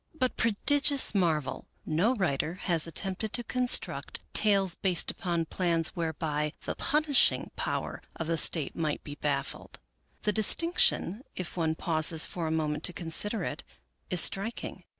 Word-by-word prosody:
But, 255 -5 -1
prodigious 275 +5 +3
marvel! 165 -8 -1 0.2
no 190 +11 +1
writer 165 - -1
has 170 -3 +3
attempted 195 +5 -2
to 240 - +2
construct 250 +1 -1
tales 195 -4 +4
based 180 -3 +2
upon 170 -3 -2
plans 170 -1 0
whereby 155 -2 -3
the - - -2
punishing 295 -2 +2
power - - -4
of 165 - -4
the 165 +1 -1
State 160 -1 +2
might 155 -3 -2
be 145 - -8
baffled. 140 -2 -4 0.5
The 210 - +1
distinction, 220 - +2
if 180 -2 -5
one 160 -2 -1
pauses 160 -1 +1
for 170 -3 -5
a - - -2
moment 155 -1 -2
to 180 - +1
consider 175 +7 0
it, - - -5 0.5
is 180 -3 +3
striking. 220 +4 -1
175 Hz, 145 wpm, -29 LUFS, 160-210 Hz, 0.5 s, tales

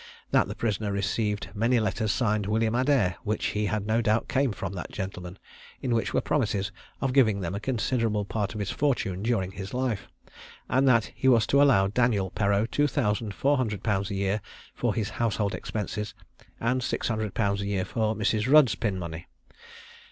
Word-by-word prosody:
That - - +4
the - - -6
prisoner 105 -2 -1
received 100 +1 -1
many 115 +4 +2
letters 110 0 0
signed 105 -4 0
"William 110 +1 +1
Adair," 125 -8 +2
which 105 +1 -2
he 105 0 0
had 105 -1 -2
no 110 +2 +2
doubt 110 0 +1
came 135 -2 +1
from 95 -1 -5
that 90 - -6
gentleman, 90 -2 -6 0.4
in 125 - -1
which 115 - 0
were - - +1
promises 110 -8 0 0.3
of 135 -2 0
giving 110 -7 +4
them 90 0 -3
a 100 - -3
considerable 110 -2 0
part 100 0 -3
of - - -4
his 100 -1 -2
fortune 115 -10 0
during 105 -5 0
his 95 +4 -7
life; 125 -5 -1 0.6
and 135 +1 +2
that 115 -4 +3
he 130 - -1
was 115 -4 +5
to 140 - +3
allow 130 -9 +5
Daniel 105 -3 +1
Perreau 100 +2 +1
two 145 +5 +1
thousand 105 -5 -1
four 145 +1 +2
hundred 110 -6 -2
pounds 100 -2 0
a 100 - -3
year 100 +2 0 0.3
for - - -1
his 110 -1 -2
household 105 -3 0
expenses, 105 0 -4 0.4
and 125 +3 0
six - - -2
hundred 110 -3 -2
pounds 100 -2 +1
a 100 - -3
year 95 -2 -1
for 110 +2 -1
Mrs. 110 +3 0
Rudd's 150 -6 +7
pin 105 -5 -2
money. 85 -2 -6
110 Hz, 190 wpm, -27 LUFS, 100-120 Hz, 0.6 s, Rudd's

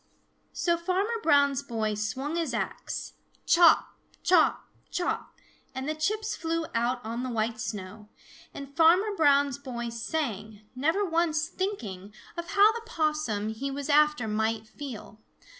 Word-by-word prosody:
So 340 -1 +1
Farmer 390 +7 -1
Brown's 285 -4 +4
boy 225 -5 -2
swung 255 +9 -3
his 325 -8 -1
axe, - - -4 0.3
chop, 340 -1 +6 0.4
chop, 355 -3 +3 0.2
chop, 355 - -3 0.4
and 260 +1 -4
the 310 - 0
chips 425 +8 -1
flew 330 0 -2
out 240 +2 0
on 230 +2 -3
the 255 - -3
white 225 -1 -1
snow, 210 +1 -6 0.4
and 280 0 -9
Farmer 360 +6 +4
Brown's 285 -4 +3
boy 240 -4 -5
sang, 225 -4 -4
never 320 +10 +1
once 330 -2 +1
thinking 215 - -5 0.2
of 340 0 -5
how 415 +2 +7
the 460 +1 -5
Possum 305 - -1
he 220 +6 -4
was 280 +1 -5
after 300 -5 +4
might 220 +1 -1
feel. 240 -5 -9
285 Hz, 140 wpm, -28 LUFS, 225-335 Hz, 0.4 s, how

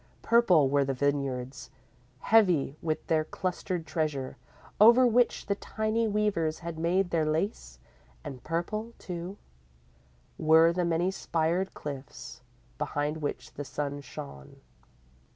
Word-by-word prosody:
Purple 185 - +5
were 140 +1 +2
the 135 0 -2
vineyards, 140 -1 -2 0.5
heavy 180 -11 +3
with 155 -2 -2
their 160 -1 +2
clustered 180 0 -3
treasure, 150 -6 -2 0.4
over 235 +4 +8
which 245 0 +2
the 200 - +1
tiny 220 +2 -1
weavers 200 -7 0
had 170 -1 -7
made 175 +2 +1
their 165 -2 +2
lace, 160 +8 -2 0.5
and 135 -5 -8
purple, 215 - -3
too, 180 +2 -6 1.0
were 160 +1 +5
the 180 0 0
many 170 +2 +1
spired 170 +1 -1
cliffs, 130 -4 -8 0.4
behind 145 +1 -2
which 150 -2 -5
the 145 - -5
sunset 145 +1 -4
shone. 70 - -10
165 Hz, 120 wpm, -29 LUFS, 145-190 Hz, 1.0 s, over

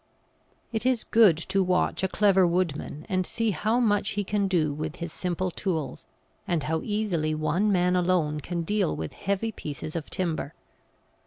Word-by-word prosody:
It 220 - -1
is 255 -3 +1
good 215 -8 +5
to 195 +4 0
watch 180 -1 +1
a 190 - +2
clever 195 -1 +4
woodman 170 -4 -2
and 185 -3 +1
see 225 +4 0
how 215 +7 +1
much 205 -4 +2
he 205 - +1
can 200 0 0
do 160 -6 +1
with 155 +2 -4
his 170 -2 -6
simple 180 0 -2
tools, 160 -9 -3 0.4
and 170 -4 0
how 160 +1 -1
easily 185 -8 -1
one 170 +7 +1
man 180 -1 +3
alone 175 -4 +1
can 170 +3 -3
deal 200 0 0
with 80 -1 -5
heavy 200 +3 -2
pieces 155 - -6
of 160 -3 -4
timber. 165 -5 -2
180 Hz, 170 wpm, -27 LUFS, 160-200 Hz, 0.4 s, good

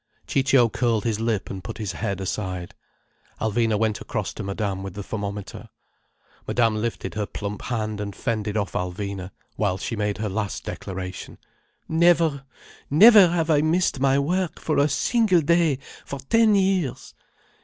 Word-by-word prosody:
Ciccio 135 -3 +3
curled 115 0 0
his 110 -3 -1
lip 115 -3 -1
and 95 -1 -6
put 110 +3 -7
his 105 -4 -3
head 100 +1 -3
aside. 95 -2 -4 0.7
Alvina 110 0 +1
went 110 -1 0
across - - -3
to - - -7
Madame 100 -1 -3
with 95 -1 -7
the 100 - -5
thermometer. 100 -1 -6 0.8
Madame 115 -2 +2
lifted 110 -3 -3
her 105 -2 -2
plump 105 -1 -5
hand 110 -4 -3
and 100 -2 -5
fended 110 -3 -2
off 100 -2 -1
Alvina, 95 +1 -4 0.3
while 100 -3 0
she 115 +4 -4
made 105 -1 -1
her 110 0 -2
last 105 0 -3
declaration: 95 -1 -6 0.5
"Never—never 165 - +4
have 165 -1 0
I 145 -1 +4
missed 160 -2 +1
my 135 0 +3
work, 175 +5 -1
for 155 - 0
a 145 +1 +3
single 195 - +2
day, 165 -2 +3 0.3
for 140 - -6
ten 215 - +3
years. 190 -8 0
115 Hz, 155 wpm, -24 LUFS, 100-150 Hz, 0.8 s, Never—never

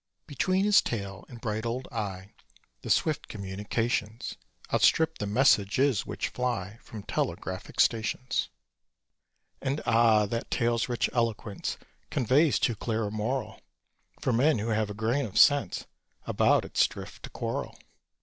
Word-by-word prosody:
Between 185 +7 +1
his 205 -1 +6
tail 100 -4 -5
and 120 - -10
bright 110 -1 -3
old 120 +3 -3
eye 100 -1 -4 0.5
The - - -7
swift 155 -3 +1
communications 105 +3 -2 0.4
Outstrip 160 0 +3
the 105 - -2
messages 120 +1 +3
which - - -3
fly 115 -4 -3
From 105 -3 -9
telegraphic 95 -1 -3
stations. 115 +3 +1 1.1
And, 140 +2 -1
ah! 115 -2 +4
that 115 +3 -4
tail's 120 0 +1
rich 120 -1 +1
eloquence 115 -4 -2 0.3
Conveys 135 +5 +3
too 120 - +1
clear 110 +1 -2
a 100 - -4
moral, 115 +5 -3 0.6
For 130 - 0
men 140 +5 +4
who 110 +2 -2
have 110 -1 0
a 105 - -6
grain 115 +5 0
of 100 - -6
sense 140 -10 +4 0.4
About - - +3
its - - +3
drift - - -10
to - - -8
quarrel. - - -4
115 Hz, 140 wpm, -28 LUFS, 105-130 Hz, 1.1 s, his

